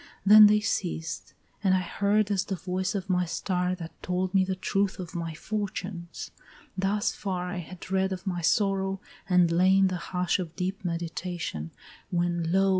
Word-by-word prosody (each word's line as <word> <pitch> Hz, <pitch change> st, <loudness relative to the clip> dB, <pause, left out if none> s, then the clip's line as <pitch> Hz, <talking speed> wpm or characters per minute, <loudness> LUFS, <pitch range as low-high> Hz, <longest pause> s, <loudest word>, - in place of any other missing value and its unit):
Then 210 Hz, +1 st, +10 dB
they 210 Hz, 0 st, +4 dB
ceased 165 Hz, -7 st, -3 dB, 0.3 s
I -, -, +1 dB
had 185 Hz, 0 st, +3 dB, 0.2 s
heard 205 Hz, +1 st, +3 dB
as 195 Hz, -2 st, +1 dB
the 195 Hz, -, -2 dB
voice 185 Hz, +2 st, -2 dB
of 195 Hz, -1 st, -3 dB
my 180 Hz, -1 st, +2 dB
star 180 Hz, +2 st, -1 dB
That 170 Hz, -2 st, -10 dB
told 180 Hz, +1 st, -1 dB
me 190 Hz, -1 st, +5 dB
the 190 Hz, 0 st, -2 dB
truth 195 Hz, +1 st, 0 dB
of 180 Hz, -3 st, -7 dB
my 165 Hz, -2 st, -4 dB
fortunes 190 Hz, -2 st, -5 dB, 0.4 s
thus 195 Hz, +2 st, +1 dB
far 180 Hz, -2 st, -3 dB
I 195 Hz, -, -4 dB
had 180 Hz, +1 st, -8 dB
read 190 Hz, 0 st, +2 dB
of 185 Hz, +1 st, -5 dB
my 180 Hz, -3 st, -2 dB
sorrow, 195 Hz, +1 st, +1 dB, 0.3 s
and 180 Hz, -2 st, +4 dB
lay 185 Hz, +3 st, +4 dB
in 195 Hz, -1 st, +5 dB
the 185 Hz, -, -2 dB
hush 180 Hz, +1 st, -1 dB
Of 170 Hz, -3 st, -5 dB
deep 190 Hz, +3 st, -3 dB
meditation, 170 Hz, -, -3 dB, 0.4 s
when 175 Hz, -2 st, 0 dB
lo! 195 Hz, +1 st, +4 dB
185 Hz, 180 wpm, -28 LUFS, 175-195 Hz, 0.4 s, Then